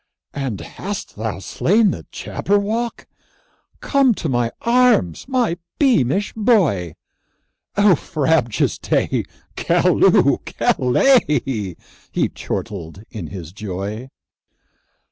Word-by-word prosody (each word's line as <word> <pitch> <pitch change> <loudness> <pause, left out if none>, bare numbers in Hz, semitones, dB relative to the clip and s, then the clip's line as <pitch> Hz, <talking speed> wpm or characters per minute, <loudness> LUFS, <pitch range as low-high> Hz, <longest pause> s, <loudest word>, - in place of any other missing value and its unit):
"And 130 -10 -4
hast 200 - -6
thou 110 0 -3
slain 195 - +2
the - - -7
Jabberwock? 215 +4 -2 0.8
Come 275 -5 +3
to 165 - -4
my 120 -2 0
arms, 235 - +3
my 245 -10 0 0.2
beamish 205 - +2
boy! 170 - +2 0.8
O 205 -2 +6
frabjous 150 - 0
day! - - 0 0.3
Callooh! - - +3
Callay!" 130 - +1 0.4
He - - 0
chortled 95 -3 -6
in 105 -8 -6
his 85 -4 -8
joy. 105 +4 -5
140 Hz, 90 wpm, -20 LUFS, -, 0.8 s, O